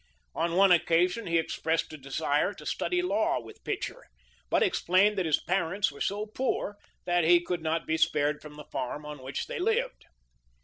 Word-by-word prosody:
On 170 0 -1
one 195 0 +6
occasion 180 +5 +3
he 170 0 +2
expressed 160 0 -1
a - - -7
desire 145 +6 0
to - - -12
study 360 -1 -1
law 220 - +1
with 115 -2 -13
Pitcher, - - -4 0.4
but - - +3
explained 195 +4 +3
that 180 - 0
his 155 - +3
parents 185 +1 0
were 140 - -13
so 205 +2 -1
poor 215 -2 -2 0.3
that 175 -1 +2
he 175 +2 +6
could 175 0 -3
not 160 +1 -1
be 160 - 0
spared 150 -1 +1
from 150 -1 -11
the 150 -1 -10
farm 145 +4 -4
on 150 -2 -8
which 130 +1 -4
they - - -5
lived. 450 +6 0
170 Hz, 185 wpm, -29 LUFS, 150-200 Hz, 0.4 s, one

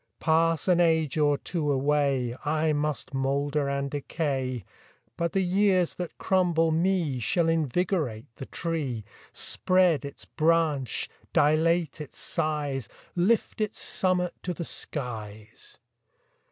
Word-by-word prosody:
Pass 165 +1 +2
an 180 -2 +4
age 160 -4 +3
or 145 -1 +3
two 155 -3 -2
away, 135 -3 +1
I 155 +1 +1
must 150 -1 -2
moulder 140 +2 0
and 140 0 -2
decay, 135 - -2 0.5
But 170 -1 -1
the 195 - +1
years 185 -1 +2
that 180 -2 -6
crumble 175 -4 +2
me 165 -5 +1
Shall 165 +8 +1
invigorate 160 - 0
the 135 - -7
tree, 145 - -3 0.3
Spread 185 -5 +2
its 140 0 -8
branch, 155 -5 +1 0.3
dilate 160 +1 +2
its 150 - -9
size, 145 -6 -2 0.3
Lift 210 +5 +1
its 215 - -2
summit 180 -1 0
to 180 -1 -3
the 170 - -4
skies. 110 -8 -5
155 Hz, 120 wpm, -27 LUFS, 140-170 Hz, 0.5 s, an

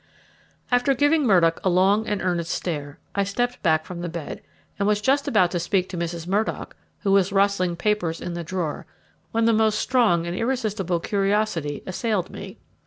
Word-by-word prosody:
After 245 +2 +3
giving 290 +1 +3
Murdock 170 -5 +4
a 190 - +2
long 195 +4 +3
and 205 -1 -2
earnest 175 -2 -1
stare, 145 -4 -4 0.2
I 200 - +1
stepped 245 +5 -2
back 160 -3 +2
from 175 -1 -7
the 175 - -3
bed, 165 -2 -6 0.4
and 200 - +1
was 210 -1 +2
just 270 +6 +1
about 185 -5 +3
to 175 - -1
speak 185 +2 0
to 190 - -6
Mrs. 170 -1 -4
Murdock, 200 +5 -2 0.3
who 200 - 0
was 195 0 +3
rustling 195 -3 +2
papers 175 -3 -1
in 175 - -5
the 170 0 -4
drawer, 170 -3 -4 0.4
when 225 0 +1
the 230 - +4
most 215 -1 +2
strong 220 -11 +2
and 170 +1 -3
irresistible 215 -7 -1
curiosity 195 -6 -1
assailed 190 0 -2
me. - - -9
195 Hz, 180 wpm, -24 LUFS, 170-215 Hz, 0.4 s, Murdock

